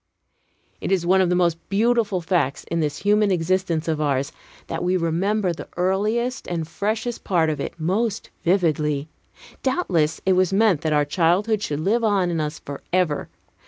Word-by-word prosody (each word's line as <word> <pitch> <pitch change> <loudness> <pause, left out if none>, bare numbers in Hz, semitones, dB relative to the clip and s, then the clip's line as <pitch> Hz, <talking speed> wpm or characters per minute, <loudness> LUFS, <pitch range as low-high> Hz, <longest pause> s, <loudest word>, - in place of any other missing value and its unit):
It - - -3
is 185 -3 +1
one 190 +2 +4
of 185 - +2
the 180 - +2
most 170 -2 +2
beautiful 215 -2 +2
facts 165 -5 0
in 170 - -3
this 150 -2 -1
human 210 0 +3
existence 175 -2 0
of 155 -2 0
ours, 140 -2 0 0.3
that - - -4
we 180 +1 +2
remember 180 +3 0
the 165 - -9
earliest 215 +8 0
and 165 -3 -3
freshest 220 +7 -3
part 165 -4 +2
of 150 - -4
it 155 - -5
most 200 +7 -1
vividly. 155 -5 +1 0.5
Doubtless 180 - 0
it 190 - +4
was 185 0 +2
meant 195 -5 +3
that 155 - -1
our 150 -1 +3
childhood 185 +8 +1
should 150 -6 -2
live 225 +7 +1
on 195 -5 +2
in 165 -2 -1
us 150 0 -3
forever. 150 +2 -2
180 Hz, 170 wpm, -23 LUFS, 160-205 Hz, 0.5 s, one